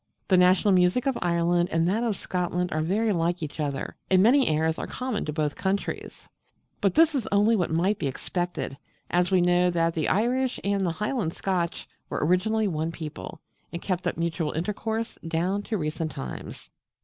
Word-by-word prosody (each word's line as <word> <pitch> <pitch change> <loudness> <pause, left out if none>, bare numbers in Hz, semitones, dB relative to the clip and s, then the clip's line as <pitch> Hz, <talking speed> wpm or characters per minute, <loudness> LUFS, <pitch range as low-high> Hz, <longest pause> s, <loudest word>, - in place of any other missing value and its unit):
The 190 - +5
national 185 +2 +5
music 180 +6 +3
of 270 -2 +1
Ireland 175 0 +2
and 165 +1 +2
that 215 +6 +1
of 225 -4 0
Scotland 180 0 -2
are 155 - 0
very 210 +7 +1
like 170 -1 0
each 150 +1 -6
other, 140 -3 -3
and 185 0 +5
many 260 +4 +5
airs 160 +1 +1
are - - -4
common 250 -4 -3
to 150 - -2
both 150 -1 -1
countries: 195 +1 -3 0.5
but 200 - +2
this 325 0 +5
is 265 -6 -1
only 205 +3 +4
what 180 -5 0
might 185 +6 +1
be 145 - -1
expected, 175 0 -3 0.3
as 175 0 +2
we 185 -2 +3
know 180 0 +3
that 165 -1 +1
the 160 -2 -1
Irish 250 +5 +1
and 200 -1 +1
the 170 -3 0
Highland 210 -3 -2
Scotch 180 -3 -2 0.2
were - - -1
originally 215 +6 +2
one 160 -2 -2
people, 150 - -8 0.3
and 170 - -4
kept 185 0 -2
up - - -2
mutual 165 -2 -1
intercourse 220 +7 -3
down 180 +5 0
to 215 +1 -3
recent 155 -1 -2
times. 65 - -8
180 Hz, 185 wpm, -26 LUFS, 165-205 Hz, 0.5 s, The